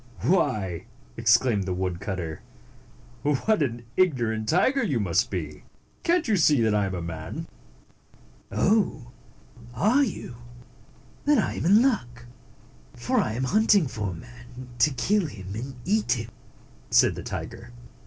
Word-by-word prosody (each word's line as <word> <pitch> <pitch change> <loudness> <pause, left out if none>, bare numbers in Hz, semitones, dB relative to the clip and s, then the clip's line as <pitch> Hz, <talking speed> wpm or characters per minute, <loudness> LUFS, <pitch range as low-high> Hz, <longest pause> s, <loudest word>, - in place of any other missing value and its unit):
Why," 110 - 0 0.3
exclaimed 115 -2 +3
the 90 -1 -2
woodcutter, 90 -2 -4 0.4
" 120 - -26
what 150 +8 +1
an 120 -4 -2
ignorant 120 -11 +1
tiger 260 - +3
you 140 - 0
must 95 -6 +1
be! 75 -6 -5 0.4
Cant 340 -1 +1
you 215 - +2
see 150 -5 +4
that 110 -1 +2
I 105 -1 +2
am 95 - -4
a 85 - -4
man?" 80 -1 -6 1.1
"Oh! 185 - +1 0.6
Are 220 - +3
you? 180 - -5 0.9
Then 295 0 +4
I 220 - 0
am - - -3
in 205 +7 +6
luck; 125 - -1 0.7
for - - 0
I 110 - 0
am 125 +3 -2
hunting 205 - +4
for 105 -5 -4
a - - -5
man, 125 +6 -12
to 135 - +5
kill 190 +7 0
him 95 -7 -8
and 130 +5 -6
eat 210 +2 +2
him," 115 -2 -5 0.6
said - - +5
the - - -7
tiger. - - -7
120 Hz, 145 wpm, -26 LUFS, -, 1.1 s, in